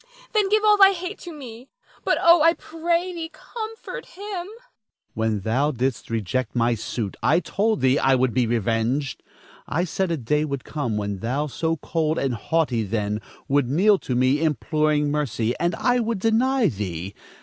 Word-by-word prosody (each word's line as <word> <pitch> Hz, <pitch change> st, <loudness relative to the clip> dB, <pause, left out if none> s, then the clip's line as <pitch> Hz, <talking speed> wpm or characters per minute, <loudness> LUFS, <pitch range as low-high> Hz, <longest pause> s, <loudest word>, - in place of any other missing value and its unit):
Then 420 Hz, -3 st, +2 dB
give 430 Hz, +1 st, +3 dB
all 420 Hz, -1 st, +6 dB
thy 390 Hz, -1 st, +7 dB
hate 365 Hz, +2 st, -6 dB
to 350 Hz, -, -8 dB
me; 255 Hz, -4 st, -10 dB, 0.3 s
but -, -, +2 dB
oh, 340 Hz, -1 st, +6 dB
I 330 Hz, +2 st, +6 dB
pray 340 Hz, +3 st, -2 dB
thee, 330 Hz, -2 st, -5 dB
comfort 445 Hz, +7 st, -7 dB
him. 395 Hz, -, -12 dB
Don 380 Hz, -4 st, -4 dB
Felix. 445 Hz, +4 st, -13 dB, 0.5 s
When 110 Hz, -1 st, 0 dB
thou 125 Hz, +8 st, +1 dB
didst 130 Hz, -2 st, -2 dB
reject 115 Hz, +2 st, -2 dB
my 120 Hz, 0 st, +2 dB
suit, 110 Hz, -1 st, -4 dB
I 155 Hz, +6 st, +4 dB
told 215 Hz, +4 st, 0 dB
thee 130 Hz, +2 st, +3 dB
I 135 Hz, 0 st, +4 dB
would 130 Hz, -2 st, +1 dB
be 125 Hz, -2 st, +2 dB
revenged; 115 Hz, +4 st, 0 dB, 0.5 s
I 165 Hz, +4 st, 0 dB
said 185 Hz, +1 st, -1 dB
a 165 Hz, -, 0 dB
day 150 Hz, +4 st, 0 dB
would 140 Hz, -3 st, -3 dB
come 130 Hz, -9 st, -3 dB
when 100 Hz, -2 st, -3 dB
thou, 130 Hz, +7 st, -1 dB
so 160 Hz, +3 st, -2 dB
cold 160 Hz, +1 st, -1 dB
and 135 Hz, -2 st, 0 dB
haughty 125 Hz, +1 st, 0 dB
then, 105 Hz, 0 st, -2 dB, 0.3 s
would 140 Hz, -3 st, +2 dB
kneel 195 Hz, +8 st, +4 dB
to 125 Hz, -, -3 dB
me 130 Hz, +4 st, +2 dB
imploring 150 Hz, -1 st, +1 dB
mercy 120 Hz, -6 st, -1 dB
and 175 Hz, 0 st, +1 dB
I 245 Hz, +1 st, +2 dB
would 230 Hz, -1 st, -1 dB
deny 230 Hz, +4 st, +2 dB
thee. 95 Hz, -, -4 dB
150 Hz, 180 wpm, -23 LUFS, -, 0.5 s, thy